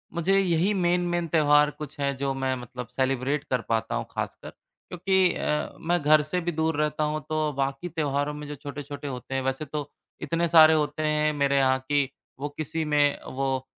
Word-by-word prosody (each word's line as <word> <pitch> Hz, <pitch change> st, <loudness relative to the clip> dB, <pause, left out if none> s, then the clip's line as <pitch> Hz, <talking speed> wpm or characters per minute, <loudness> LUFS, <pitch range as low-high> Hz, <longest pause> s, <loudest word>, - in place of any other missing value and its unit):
मुझे 190 Hz, +4 st, +2 dB
यही 180 Hz, +2 st, +2 dB
main 180 Hz, -1 st, +2 dB
main 175 Hz, -1 st, -1 dB
त्यौहार 150 Hz, -2 st, +4 dB
कुछ 145 Hz, -1 st, -9 dB
हैं 140 Hz, -1 st, 0 dB
जो 135 Hz, 0 st, -1 dB
मैं 130 Hz, -1 st, -1 dB
मतलब 125 Hz, 0 st, -8 dB
सेलिब्रेट 135 Hz, +2 st, -1 dB
कर 125 Hz, -2 st, +1 dB
पाता 115 Hz, 0 st, 0 dB
हूँ -, -, -2 dB
ख़ासकर। -, -, -5 dB
क्योंकि 185 Hz, 0 st, -1 dB
अ, 150 Hz, -, -1 dB
मैं 175 Hz, +1 st, +1 dB
घर 150 Hz, +1 st, +5 dB
से 155 Hz, +5 st, -2 dB
भी 175 Hz, +1 st, -1 dB
दूर 160 Hz, 0 st, 0 dB
रहता 150 Hz, 0 st, 0 dB
हूँ 150 Hz, +1 st, -1 dB
तो 155 Hz, -1 st, 0 dB
बाक़ी 135 Hz, +5 st, -2 dB
त्योहारों 145 Hz, -2 st, -1 dB
में 150 Hz, 0 st, -7 dB
जो 150 Hz, -, -6 dB
छोटे-छोटे 145 Hz, 0 st, -7 dB
होते 130 Hz, 0 st, -5 dB
हैं, 135 Hz, -, 0 dB
वैसे 135 Hz, +3 st, -2 dB
तो 145 Hz, 0 st, -5 dB, 0.3 s
इतने 170 Hz, 0 st, 0 dB
सारे 160 Hz, -1 st, +8 dB
होते 150 Hz, 0 st, 0 dB
हैं 150 Hz, 0 st, +2 dB
मेरे 140 Hz, -1 st, +1 dB
यहाँ 130 Hz, -1 st, +3 dB
कि 140 Hz, -2 st, +2 dB, 0.3 s
वो 145 Hz, +1 st, -3 dB
किसी 160 Hz, +1 st, -2 dB
में 145 Hz, -1 st, +2 dB
वो 135 Hz, 0 st, -2 dB
150 Hz, 195 wpm, -26 LUFS, 135-160 Hz, 0.3 s, सारे